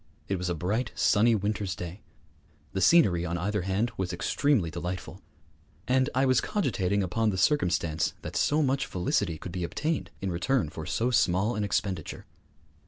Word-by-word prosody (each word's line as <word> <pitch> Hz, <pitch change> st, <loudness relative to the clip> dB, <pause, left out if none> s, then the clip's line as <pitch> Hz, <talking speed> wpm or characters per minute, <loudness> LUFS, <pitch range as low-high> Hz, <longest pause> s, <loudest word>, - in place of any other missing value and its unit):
It 95 Hz, -, -1 dB
was 90 Hz, 0 st, -2 dB
a 90 Hz, -, -1 dB
bright, 105 Hz, +8 st, -1 dB
sunny 115 Hz, +2 st, +4 dB
winter's 100 Hz, -3 st, -2 dB
day; 90 Hz, +4 st, -7 dB, 0.7 s
the 95 Hz, -, -1 dB
scenery 95 Hz, -, +5 dB
on 85 Hz, 0 st, -2 dB
either 100 Hz, +3 st, -1 dB
hand 95 Hz, +6 st, 0 dB
was 95 Hz, -2 st, -2 dB
extremely 95 Hz, -, +1 dB
delightful; 90 Hz, +2 st, -5 dB, 0.7 s
and 130 Hz, +2 st, +2 dB
I 130 Hz, +1 st, +3 dB
was 130 Hz, -2 st, +3 dB
cogitating 100 Hz, -, 0 dB
upon 110 Hz, +5 st, 0 dB
the 95 Hz, -, -2 dB
circumstance 90 Hz, -, +1 dB
that -, -, -6 dB
so 150 Hz, +1 st, +2 dB
much 135 Hz, 0 st, 0 dB
felicity 90 Hz, -1 st, -1 dB
could 90 Hz, -, -8 dB
be 90 Hz, 0 st, -3 dB
obtained 155 Hz, -, -2 dB
in 95 Hz, -1 st, -2 dB
return 95 Hz, -, 0 dB
for 80 Hz, 0 st, -7 dB
so 120 Hz, +3 st, 0 dB
small 95 Hz, 0 st, +2 dB
an 105 Hz, -2 st, -2 dB
expenditure. 95 Hz, -4 st, -2 dB
95 Hz, 170 wpm, -28 LUFS, 90-120 Hz, 0.7 s, scenery